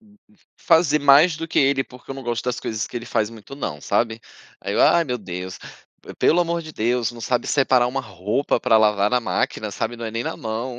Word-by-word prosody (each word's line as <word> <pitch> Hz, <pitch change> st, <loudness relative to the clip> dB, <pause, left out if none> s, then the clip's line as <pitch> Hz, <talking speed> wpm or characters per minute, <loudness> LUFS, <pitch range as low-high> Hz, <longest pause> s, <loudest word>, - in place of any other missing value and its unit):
hum, 210 Hz, -2 st, -24 dB, 0.4 s
fazer 160 Hz, -3 st, +3 dB
mais 145 Hz, +4 st, +6 dB
do 165 Hz, 0 st, -6 dB
que -, -, 0 dB
ele. 135 Hz, -1 st, +3 dB
´Porque 125 Hz, +1 st, -15 dB
eu -, -, -4 dB
não 135 Hz, -, -8 dB
gosto 120 Hz, -1 st, -3 dB
das 125 Hz, -1 st, -2 dB
coisas 110 Hz, -1 st, -3 dB
que -, -, -8 dB
ele 120 Hz, -, -6 dB
faz 110 Hz, -2 st, 0 dB
muito, 115 Hz, +4 st, -11 dB
não, 80 Hz, -, -5 dB
sabe? 115 Hz, +6 st, -1 dB, 0.4 s
Aí -, -, -4 dB
eu: -, -, +2 dB
"Ah, 170 Hz, -, +5 dB
meu 125 Hz, -4 st, -3 dB
Deus, 90 Hz, -2 st, -7 dB, 0.6 s
pelo 175 Hz, -, +4 dB
amor 170 Hz, -1 st, -1 dB
de 155 Hz, -1 st, -10 dB
Deus, 120 Hz, 0 st, 0 dB
não 120 Hz, -, -11 dB
sabe 120 Hz, +1 st, -1 dB
separar 130 Hz, -3 st, +3 dB
uma 135 Hz, +2 st, -2 dB
roupa 105 Hz, +3 st, -2 dB
pra 110 Hz, -, +4 dB
lavar 105 Hz, -1 st, +3 dB
na 125 Hz, -, +2 dB
máquina, 110 Hz, -2 st, -2 dB
sabe, 115 Hz, +3 st, -3 dB
não 115 Hz, -, -7 dB
é 110 Hz, -, -4 dB
nem 115 Hz, +1 st, -3 dB
na -, -, -4 dB
mão", 115 Hz, +2 st, -5 dB
120 Hz, 235 wpm, -22 LUFS, 110-140 Hz, 0.6 s, mais